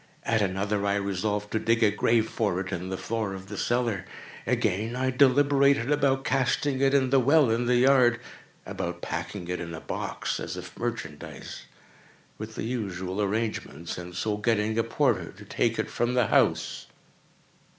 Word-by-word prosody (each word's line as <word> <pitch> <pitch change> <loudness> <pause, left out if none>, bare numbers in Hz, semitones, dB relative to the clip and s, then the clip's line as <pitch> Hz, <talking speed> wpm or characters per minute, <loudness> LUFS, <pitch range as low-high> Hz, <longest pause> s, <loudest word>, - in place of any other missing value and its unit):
At 110 -2 +1
another, 100 +1 0
I 100 - +2
resolved 100 +1 -2
to 110 - +1
dig 115 +1 +2
a 105 - +5
grave 110 +2 +2
for 100 -6 -1
it 95 +1 -4
in 90 +1 -4
the 95 - -3
floor 110 -3 -3
of 95 +1 -10
the 105 - -6
cellar. 115 -3 0 0.4
Again, 115 -1 0
I 130 +1 0
deliberated 140 0 +4
about 135 -2 +2
casting 135 +1 +1
it 135 0 +4
in 130 -2 +2
the 135 - +5
well 140 0 +4
in 120 +2 0
the 125 - +3
yard—about 120 -8 0
packing 85 +3 -4
it 90 0 -3
in 85 -1 -5
a - - -7
box, - - -3
as - - -5
if - - -9
merchandise, 110 -11 -6 0.7
with 110 +1 -7
the - - -4
usual 95 -5 -3
arrangements, 100 -6 -2
and 90 0 -8
so 105 +3 -1
getting 110 0 +1
a - - +3
porter - - 0
to - - -13
take - - 0
it - - -2
from 120 +1 0
the 125 -2 +4
house. - - +1
110 Hz, 170 wpm, -27 LUFS, 95-125 Hz, 0.7 s, a